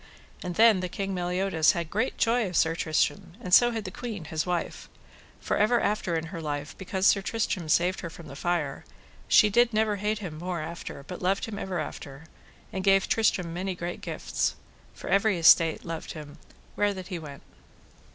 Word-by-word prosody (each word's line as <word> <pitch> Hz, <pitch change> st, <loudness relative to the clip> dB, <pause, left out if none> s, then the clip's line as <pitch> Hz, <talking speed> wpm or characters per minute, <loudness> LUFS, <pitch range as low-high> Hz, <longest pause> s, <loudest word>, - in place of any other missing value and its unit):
And 180 Hz, -1 st, -5 dB
then 225 Hz, -3 st, +6 dB
the 180 Hz, 0 st, -3 dB
King 195 Hz, +2 st, -3 dB
Meliodas 180 Hz, -2 st, +2 dB
had 170 Hz, -2 st, -4 dB
great 220 Hz, +6 st, -1 dB
joy 230 Hz, -1 st, +2 dB
of 180 Hz, -, -2 dB
Sir 160 Hz, -, +3 dB
Tristram, 155 Hz, -1 st, -1 dB
and 185 Hz, -7 st, -5 dB
so 240 Hz, +4 st, +8 dB
had 225 Hz, -2 st, -3 dB
the 185 Hz, -, -5 dB
queen, 215 Hz, -6 st, -6 dB
his 160 Hz, +2 st, -3 dB
wife. 175 Hz, -1 st, -3 dB, 0.5 s
For -, -, -1 dB
ever 215 Hz, +3 st, +3 dB
after 205 Hz, -5 st, 0 dB
in 160 Hz, 0 st, -2 dB
her 165 Hz, -, -5 dB
life, 145 Hz, -1 st, -4 dB
because 190 Hz, 0 st, -2 dB
Sir 200 Hz, -, +5 dB
Tristram 195 Hz, -5 st, -2 dB
saved 180 Hz, +4 st, +2 dB
her 170 Hz, -, -5 dB
from 165 Hz, 0 st, -12 dB
the 140 Hz, -, -10 dB
fire, 155 Hz, -3 st, -2 dB, 0.4 s
she 210 Hz, -, +6 dB
did 240 Hz, +2 st, +4 dB
never 215 Hz, -1 st, +1 dB
hate 210 Hz, +2 st, -1 dB
him 175 Hz, -7 st, -7 dB
more 180 Hz, 0 st, -3 dB
after, 160 Hz, -2 st, -7 dB
but 180 Hz, +6 st, -8 dB
loved 190 Hz, +2 st, +1 dB
him 210 Hz, -3 st, -6 dB
ever 190 Hz, -2 st, -3 dB
after, 145 Hz, -1 st, -7 dB, 0.5 s
and 190 Hz, -, -3 dB
gave 195 Hz, 0 st, +4 dB
Tristram 180 Hz, -6 st, +1 dB
many 185 Hz, +2 st, -3 dB
great 175 Hz, 0 st, -5 dB
gifts; -, -, -2 dB, 0.4 s
for -, -, -9 dB
every 200 Hz, 0 st, +3 dB
estate 165 Hz, -1 st, +5 dB
loved 165 Hz, -1 st, -5 dB
him, 150 Hz, -1 st, -10 dB, 0.4 s
where 205 Hz, -1 st, +1 dB
that 185 Hz, -1 st, -8 dB
he 180 Hz, -3 st, -4 dB
went. 145 Hz, -3 st, -10 dB
180 Hz, 195 wpm, -27 LUFS, 165-205 Hz, 0.5 s, so